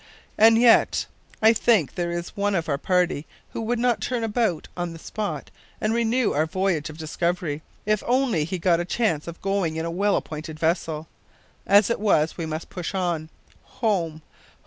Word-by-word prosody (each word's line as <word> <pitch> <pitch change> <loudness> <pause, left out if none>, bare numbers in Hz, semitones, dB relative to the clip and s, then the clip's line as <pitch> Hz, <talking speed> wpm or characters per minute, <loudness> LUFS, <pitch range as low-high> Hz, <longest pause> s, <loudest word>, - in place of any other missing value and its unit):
And 225 +1 +6
yet 235 0 +5 0.4
I 220 - +8
don't 225 - +4
think 195 - +3
there 175 -1 -2
is 175 0 -5
one 205 0 0
of 165 -3 -1
our 140 -2 -1
party 180 -4 +1 0.2
who - - -4
would 235 +2 -1
not 235 -3 +1
turn 240 +2 -1
about 220 -6 0
on 175 -1 -3
the - - -9
spot 170 -4 -5 0.3
and 215 +1 0
renew 235 +1 +1
our 155 +2 +1
voyage 185 -4 -1
of 155 - -10
discovery, 160 -1 -2 0.2
if 215 0 +2
he - - -12
only 245 - +2
got 170 -1 +2
a - - 0
chance 175 -5 -1
of 170 0 -7
going 195 -5 0
in 160 +1 -2
a 170 - -3
well 200 +3 +1
appointed 155 0 -5
vessel. 160 -1 -1 0.6
As 205 +2 +5
it - - 0
is, 160 -7 +2
we 165 -2 -4
must 155 +1 -5
push 180 +1 -5
on. 170 -4 -1 0.5
Home! 165 -8 0
180 Hz, 190 wpm, -24 LUFS, 160-215 Hz, 0.6 s, I